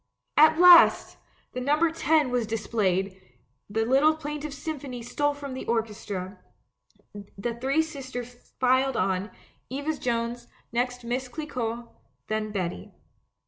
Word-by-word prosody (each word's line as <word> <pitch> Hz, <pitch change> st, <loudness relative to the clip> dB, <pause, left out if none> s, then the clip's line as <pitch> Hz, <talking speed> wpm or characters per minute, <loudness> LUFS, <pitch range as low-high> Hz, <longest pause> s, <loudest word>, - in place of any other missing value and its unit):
At 310 Hz, +1 st, +6 dB
last! 355 Hz, -1 st, +7 dB, 0.4 s
The 255 Hz, -, -4 dB
number 300 Hz, +5 st, +2 dB
'10' 310 Hz, -4 st, +2 dB
was 245 Hz, -3 st, 0 dB
dis 220 Hz, -1 st, -3 dB
played; 190 Hz, -3 st, 0 dB, 0.5 s
the 225 Hz, +2 st, 0 dB
little 275 Hz, +6 st, +4 dB
plaintive 300 Hz, -1 st, -5 dB
symphony 275 Hz, -4 st, -6 dB
stole 290 Hz, +4 st, -1 dB
from 280 Hz, -2 st, -7 dB
the 260 Hz, -, -5 dB
orchestra, 210 Hz, -4 st, -3 dB, 1.0 s
the 235 Hz, +4 st, -3 dB
three 270 Hz, +7 st, +1 dB
girls 255 Hz, -5 st, -8 dB
filed 260 Hz, 0 st, +2 dB
on 190 Hz, +2 st, 0 dB, 0.2 s
— -, -, -39 dB
Eva 285 Hz, +5 st, -2 dB
Jones, 235 Hz, -1 st, -2 dB, 0.2 s
next 245 Hz, +1 st, -1 dB
JVIiss 250 Hz, +2 st, -3 dB
Clicquot, 240 Hz, -5 st, -4 dB, 0.4 s
then 215 Hz, 0 st, -2 dB
Betty. 175 Hz, -, -4 dB
250 Hz, 130 wpm, -26 LUFS, 225-290 Hz, 1.0 s, last